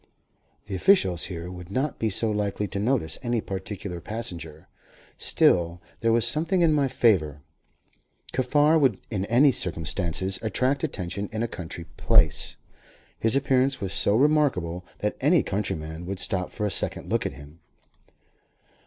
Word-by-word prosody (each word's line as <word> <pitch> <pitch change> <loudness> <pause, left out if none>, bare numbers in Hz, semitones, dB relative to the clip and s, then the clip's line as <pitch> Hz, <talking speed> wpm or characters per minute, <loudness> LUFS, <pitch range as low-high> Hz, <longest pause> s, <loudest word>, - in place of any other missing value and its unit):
The 100 - -7
officials 95 - +3
here 85 0 -6
would 90 -1 -10
not 130 +7 -2
be 110 - 0
so 110 +2 +2
likely 105 0 -2
to 100 - -4
notice 110 - 0
any 120 -2 0
particular 95 -3 -6
passenger. 85 -7 -5 0.5
Still 85 -1 +2 0.2
there 115 - +2
was 115 0 +3
something 165 +8 +2
in 165 -2 +4
my 145 -2 +2
favour. 85 - +1 0.9
Kaffar 145 +5 +3
would 130 -9 +2
in 100 -3 -1
any 130 +6 +5
circumstances 90 0 -1
attract 130 +5 0
attention 100 - -3
in 110 +1 -2
a - - 0
country 85 -4 -7
place. - - +2 0.6
His 115 +2 +3
appearance 135 -1 +2
was 95 -1 -3
so 100 - +2
remarkable, 125 - +2 0.2
that 105 - -1
any 150 +4 +4
countryman 85 -5 -3
would 95 +1 -4
stop 90 -1 -2
for 105 - -3
a 105 - -1
second - - -1
look - - +1
at - - -7
him. 75 +4 -14
105 Hz, 150 wpm, -25 LUFS, 90-130 Hz, 0.9 s, any